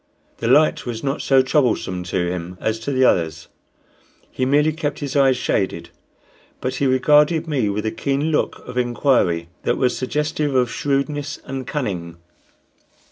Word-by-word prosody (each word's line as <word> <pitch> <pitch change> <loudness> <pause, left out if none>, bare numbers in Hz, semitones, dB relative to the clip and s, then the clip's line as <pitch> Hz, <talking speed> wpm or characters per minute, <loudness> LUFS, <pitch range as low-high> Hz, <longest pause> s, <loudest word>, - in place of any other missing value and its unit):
The - - -3
light 150 +2 +3
was 115 -2 -4
not 140 +2 -1
so 135 -1 +4
troublesome 125 -9 0
to 90 0 -1
him 90 0 -5
as 110 0 -1
to 125 +5 -4
the 130 -1 +3
others 80 -7 0 0.8
he 130 - -1
merely 150 +3 +3
kept 150 -2 -3
his 140 -2 -5
eyes 135 -2 +4
shaded; 95 -8 -2 0.7
but 130 +1 -3
he 140 - +1
regarded 150 +5 +3
me 130 -9 0
with 105 +2 -2
a 110 - 0
keen 140 +3 -1
look 150 - -1
of 125 0 -3
inquiry 120 - +1
that - - 0
was 125 -1 +1
suggestive 150 +1 -1
of 125 -2 +2
shrewdness 145 +1 -2
and 135 -2 -5
cunning. 90 - -4
130 Hz, 160 wpm, -21 LUFS, 110-145 Hz, 0.8 s, so